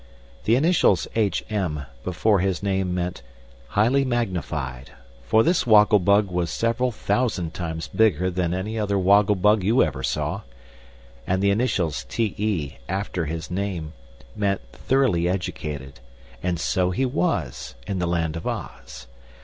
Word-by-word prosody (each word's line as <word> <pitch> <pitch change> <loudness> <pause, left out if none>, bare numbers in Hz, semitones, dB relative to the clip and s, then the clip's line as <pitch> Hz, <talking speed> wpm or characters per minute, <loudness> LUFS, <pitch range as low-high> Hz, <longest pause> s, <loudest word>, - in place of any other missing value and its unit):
The 115 - +4
initials 165 +7 +3
"H. 105 -5 +1
M." 90 -9 -2 0.2
before 95 +4 +2
his 95 -2 -1
name 95 -2 0
meant 90 -2 -3 0.5
"Highly 120 - +2
Magnified," 85 - -3 0.4
for 110 - +5
this 170 -3 +2
Woggle 105 -1 +6
Bug 100 +1 +3
was 90 -2 -1
several 115 +5 0
thousand 110 -8 -1
times 80 -2 -4
bigger 95 -5 +2
than 90 -1 -1
any 105 +5 -3
other 100 -1 0
woggle 100 +2 +4
bug 105 +2 +3
you 110 +7 +4
ever 70 -4 -2
saw. - - -2 0.9
And 95 +1 +1
the 100 - +4
initials 100 - 0
"T. 110 -4 -1
E." 95 -10 -1
after 95 -2 -2
his 80 +2 -5
named 90 -4 -3 0.4
meant 100 -1 0
"Thoroughly 90 - +1
Educated" 75 -7 -4 0.4
and 90 -2 -1
so 90 +2 +1
he 110 +9 0
was, 95 - -2
in 95 - -3
the 90 - 0
Land 85 -2 -1
of 80 - -5
Oz. - - -6
95 Hz, 145 wpm, -24 LUFS, 85-110 Hz, 0.9 s, Woggle